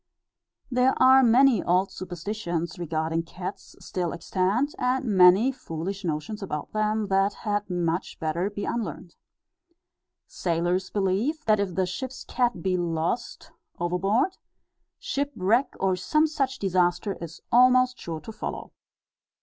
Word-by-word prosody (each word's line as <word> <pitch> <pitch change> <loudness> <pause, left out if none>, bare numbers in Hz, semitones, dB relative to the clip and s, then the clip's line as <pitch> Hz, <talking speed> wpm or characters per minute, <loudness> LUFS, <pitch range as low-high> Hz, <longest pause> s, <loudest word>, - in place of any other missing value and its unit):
There 250 +1 +2
are 265 +1 +7
many 250 -2 +5
old 185 +2 +1
superstitions 175 -1 -4
regarding 160 0 -1
cats 180 +3 -8
still 180 -4 -3
extant, 195 - 0
and 255 +1 0
many 195 +3 +6
foolish 195 - -6
notions 175 +7 -3
about 150 -6 -5
them, 215 0 0
that 195 +1 +2
had 205 -1 -1
much 175 0 -2
better 170 +4 -1
be 205 0 -5
unlearned. 185 -6 -4 1.1
Sailors 175 +2 -1
believe, 210 +11 -1
that, 215 -1 +3
if 190 -4 -2
the 190 - +2
ship's 260 +8 -6
cat 245 -9 -1
be 185 -1 +1
lost 170 +6 -3 0.3
overboard, 195 - 0 0.6
shipwreck, 265 -3 0
or 190 -1 +2
some 305 - +2
such 275 -4 -1
disaster, 180 0 +1
is 165 -1 -9
almost 255 +1 +5
sure 160 -2 -6
to 220 - -8
follow. 215 - -6
195 Hz, 125 wpm, -26 LUFS, 175-240 Hz, 1.1 s, are